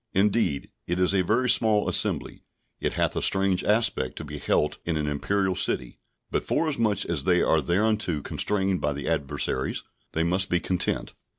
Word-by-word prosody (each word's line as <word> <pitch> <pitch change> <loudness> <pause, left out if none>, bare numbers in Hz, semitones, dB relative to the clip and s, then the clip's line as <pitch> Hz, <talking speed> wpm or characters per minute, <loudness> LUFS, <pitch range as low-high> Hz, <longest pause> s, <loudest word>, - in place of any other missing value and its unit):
Indeed, 100 -7 +1 0.2
it 85 +1 -1
is 90 +1 +3
a 95 - +3
very 115 +8 +1
small 110 -3 +4
assembly; - - 0 0.4
it - - -1
hath - - 0
a - - -1
strange 95 -1 +2
aspect 105 - +1
to - - -6
be - - -7
held - - 0
in 85 -2 -2
an 75 - -1
Imperial 95 +7 0
city; 95 - -2 0.3
but - - -1
forasmuch 115 - 0
as 75 -5 -2
they 90 -1 +3
are 80 - +3
thereunto 95 -2 0
constrained 95 -2 0
by 75 0 0
the 70 0 -6
adversaries, 70 -4 -1 0.3
they 80 - +1
must 90 +3 +1
be 90 - +2
content. 90 +2 -1
95 Hz, 175 wpm, -25 LUFS, 80-105 Hz, 0.4 s, small